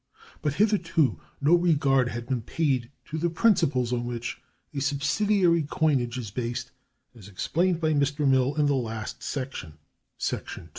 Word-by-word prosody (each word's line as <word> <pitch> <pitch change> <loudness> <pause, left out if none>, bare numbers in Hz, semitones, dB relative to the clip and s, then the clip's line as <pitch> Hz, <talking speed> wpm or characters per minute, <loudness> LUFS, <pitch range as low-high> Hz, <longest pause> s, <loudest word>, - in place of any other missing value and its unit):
But 150 -1 -1
hitherto 180 -8 +2 0.2
no 145 +4 +3
regard 145 -7 +3
had 120 0 -5
been 125 -1 -1
paid 130 -2 0 0.2
to 160 - -4
the 170 +2 +1
principles 150 - +2
on 120 -1 0
which 120 -1 -5 0.3
a 140 - -2
subsidiary 170 +6 +2
coinage 130 -7 +1
is 115 -5 -5
based, 125 +2 -4 0.4
as 105 -5 -13
explained 165 - 0
by 155 -2 +1
Mr. 145 0 +1
Mill 130 +1 +3
in 150 -1 +2
the 145 - +3
last 115 -2 -3
section 130 - -5 0.4
(§ - - -3
2). - - -11
140 Hz, 155 wpm, -27 LUFS, 120-160 Hz, 0.4 s, no